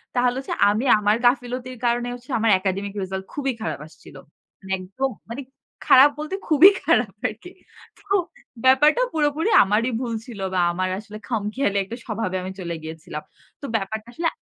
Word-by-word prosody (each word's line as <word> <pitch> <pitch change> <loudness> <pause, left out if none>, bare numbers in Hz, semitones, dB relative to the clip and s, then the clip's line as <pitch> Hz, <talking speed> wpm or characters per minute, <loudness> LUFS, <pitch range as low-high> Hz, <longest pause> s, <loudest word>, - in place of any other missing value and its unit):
তাহলে 245 0 +2
হচ্ছে 270 - -4 0.2
আমি 215 +5 0
আমার 210 +1 +3
গাফিলতির 250 0 0
কারণে 240 0 +1
হচ্ছে 245 +2 -12
আমার 225 0 +3
একাডেমিক 195 +1 -2
রিসাল্ট 190 0 -5
খুবই 275 -2 -1
খারাপ 220 - -3
আসছিল। 160 - -17 0.4
মানে 190 -1 -10
একদম 200 +9 -3 0.2
মানে 255 +4 -5 0.5
খারাপ 270 +3 +8
বলতে 305 +5 -3
খুবই 325 +5 +8
খারাপ 250 - +3 0.2
আরকি। 225 +12 -9 0.5
তো - - -24 0.6
ব্যাপারটা 295 - +5
পুরোপুরি 305 +4 +1
আমারই 215 +5 +1
ভুল 240 -2 -3
ছিল 230 -5 -10
বা 185 - +1
আমার 185 +2 -1
আসলে 215 0 -10
খাম 225 -5 -1
খেয়ালি 205 -6 0
একটা 225 +5 -8
স্বভাবে 215 -4 -3
আমি 185 - -5
চলে 170 -2 -4
গিয়েছিলাম। 160 -1 -7 0.4
তো - - -6
ব্যাপারটা 220 +1 -3
আসলে 330 +5 -1
230 Hz, 165 wpm, -23 LUFS, 195-265 Hz, 0.6 s, খারাপ